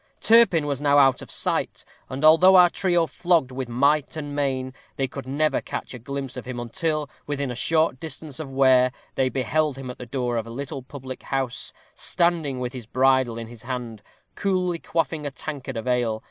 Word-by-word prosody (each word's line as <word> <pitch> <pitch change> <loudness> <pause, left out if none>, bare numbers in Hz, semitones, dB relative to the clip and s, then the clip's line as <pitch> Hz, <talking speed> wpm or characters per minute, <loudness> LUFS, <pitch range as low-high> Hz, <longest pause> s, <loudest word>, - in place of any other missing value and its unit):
Turpin 225 -9 +5
was 140 -1 -2
now 145 -1 +4
out 135 -3 +5
of - - -10
sight, - - -2 0.2
and 135 +4 -2
although 175 +5 +7
our 180 -1 +7
trio 175 -3 +2
flogged 165 -2 +1
with 130 -1 -5
might 140 +5 +2
and 145 -2 -5
main, 130 -2 -1 0.2
they 135 - 0
could 130 0 -8
never 150 +3 +1
catch - - -6
a 125 - -7
glimpse 135 +2 -5
of 125 - -7
him 125 -1 -5
until, 150 +6 -2 0.2
within 140 -2 -2
a - - -5
short 160 0 +1
distance 155 -2 -6
of 155 -4 -5
Ware, 130 -1 +4 0.2
they 130 -1 +1
beheld 135 +3 0
him 130 -2 -6
at - - -12
the 125 - -8
door 125 -1 -2
of 115 0 -3
a - - -8
little 135 +3 -5
public 130 0 -9
house, 135 -3 -2 0.2
standing 165 -6 0
with 125 0 -4
his 125 -4 -8
bridle 130 -1 +2
in 115 - -5
his 115 -1 -12
hand, 120 -3 -5 0.3
coolly 185 -3 0
quaffing 160 -2 -2
a - - -1
tankard 135 -3 -6
of 115 - -5
ale. 120 -3 +1
135 Hz, 200 wpm, -24 LUFS, 125-155 Hz, 0.3 s, although